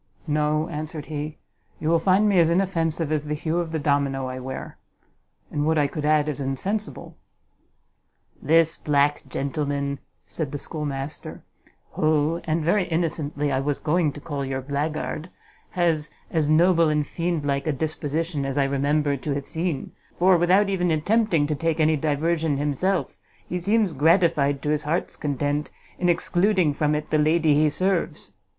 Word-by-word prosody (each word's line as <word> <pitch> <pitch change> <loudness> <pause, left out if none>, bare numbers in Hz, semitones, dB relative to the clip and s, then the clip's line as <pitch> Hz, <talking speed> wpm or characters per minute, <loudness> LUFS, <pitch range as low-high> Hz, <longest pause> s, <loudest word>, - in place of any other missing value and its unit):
"No," 150 0 +1
answered 150 0 -5
he; 150 0 -5 0.4
"you 155 - -3
will 165 +1 +4
find 190 +5 +3
me 200 -3 +4
as 165 -1 +5
inoffensive 165 -3 0
as 150 -1 0
the 150 0 -2
hue 160 +3 -1
of 170 -2 -3
the 160 - -1
domino 140 -2 0
I 130 0 -5
wear; 130 +1 -7 0.7
and 145 - -1
would 160 0 +2
I 145 - +3
could 150 +1 -4
add 150 0 +3
as 145 -2 -3
insensible!" 190 +11 -3 1.2
"This 160 +2 +3
black 145 0 +2
gentleman," 140 +1 -2 0.3
said 155 -5 -4
the 145 - -3
schoolmaster, 145 -1 -5 0.5
"who, 155 +2 +1
and 160 0 0
very 185 +3 +2
innocently, 155 -3 -1
I 130 - +1
was 140 +1 -1
going 155 0 +1
to - - -9
call 145 -2 -4
your 135 0 -3
black 145 +3 -1
guard, 155 +2 -4 0.4
has 165 -4 +1 0.2
as 155 -3 +1
noble 165 +1 +4
and 150 -1 +1
fiend 170 -1 -2
like 140 +1 -1
a - - +3
disposition 155 +1 -2
as 135 0 -3
I 140 - +4
remember 140 +1 +1
to 140 +2 -3
have 140 -1 -4
seen; 165 -4 -3 0.2
for 185 +1 +5
without 180 +4 +4
even 180 -3 0
attempting 170 0 +2
to 150 - -1
take 165 +2 -1
any 155 0 +4
diversion 155 +1 0
himself, 150 +7 -1 0.3
he 180 - -2
seems 205 0 +1
gratified 145 -2 +3
to 150 - -1
his 150 -1 +1
heart's 155 +4 -2
content 145 0 -2 0.3
in 180 - +2
excluding 175 -1 +2
from 150 +1 +1
it 150 0 -4
the 155 - +3
lady 155 0 +3
he 150 +1 +4
serves." 175 -1 -1
155 Hz, 170 wpm, -24 LUFS, 145-170 Hz, 1.2 s, as